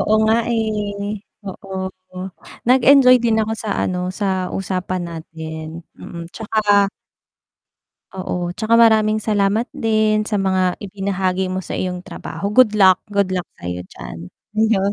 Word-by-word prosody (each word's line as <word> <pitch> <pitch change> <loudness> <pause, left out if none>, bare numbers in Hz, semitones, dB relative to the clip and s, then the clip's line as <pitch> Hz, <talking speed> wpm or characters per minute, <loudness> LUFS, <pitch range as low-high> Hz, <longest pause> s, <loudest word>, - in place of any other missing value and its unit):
Oo 215 - +2
nga 220 - +4 0.2
eh, 210 -2 -2 0.3
oo, 190 0 -7 0.9
nag-enjoy 255 0 +7
din 220 -1 +3
ako 220 - -2
sa 215 -1 -5
ano, 180 0 -2
sa 190 -2 -2
usapan 185 -1 -2
natin, 160 0 -7
mm, 170 -1 -8
tsaka 205 -2 +2 1.3
oo, 180 -1 -3
tsaka 220 +1 +2
maraming 215 -2 +4
salamat 210 +2 +1 0.2
din 215 -1 +2
sa - - -1
mga 190 -1 +1 0.2
ibinahagi 190 -1 -1
mo 185 0 -2
sa - - -5
iyong 180 -1 -3
trabaho, 200 +2 -5
good 220 -1 +5
luck, 190 -3 +6
good 200 -2 0
luck 180 -1 -2
sa'yo 90 0 -5
diyan, 80 - -9 0.5
'yon, 200 0 +1
200 Hz, 135 wpm, -20 LUFS, 185-215 Hz, 1.3 s, nag-enjoy